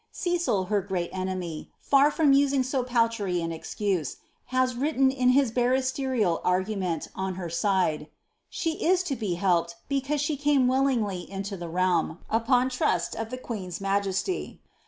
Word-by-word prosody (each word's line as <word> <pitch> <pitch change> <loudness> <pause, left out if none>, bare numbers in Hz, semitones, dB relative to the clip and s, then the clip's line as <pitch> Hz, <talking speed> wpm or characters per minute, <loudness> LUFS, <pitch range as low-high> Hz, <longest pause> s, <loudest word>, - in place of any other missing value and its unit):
Cecil, 345 - 0
her 200 +2 0
great 185 -3 -3
enemy, 185 -4 -4
far 280 +1 +4
from 295 -2 +3
using 275 -1 +3
so 255 0 -1
paltry 230 -7 0
an 165 0 -3
excuse, 175 -1 -2 0.3
has 255 0 +1
written 270 0 +2
in 255 -2 +2
his 260 -2 +4
barristerial 255 -5 +1
argument 185 -2 -1
on 190 -1 -3
her 175 -3 -5
side, 185 -4 +1
^^ 150 - -12 0.4
She 325 -2 -3
is 365 +2 +3
to 290 -7 -2
be 210 -7 -2
helped 170 -2 +1
because 280 +1 -1
she 295 +1 -1
came 285 -2 +3
willingly 250 -8 0
into 195 +1 -5
the 175 -2 -6
realm, 175 -1 +1
upon 245 +3 +2
trust 280 +5 0
of 225 0 -4
the 255 - -5
queen's 195 -9 -6
majesty." 195 - -1
225 Hz, 155 wpm, -27 LUFS, 185-265 Hz, 0.4 s, far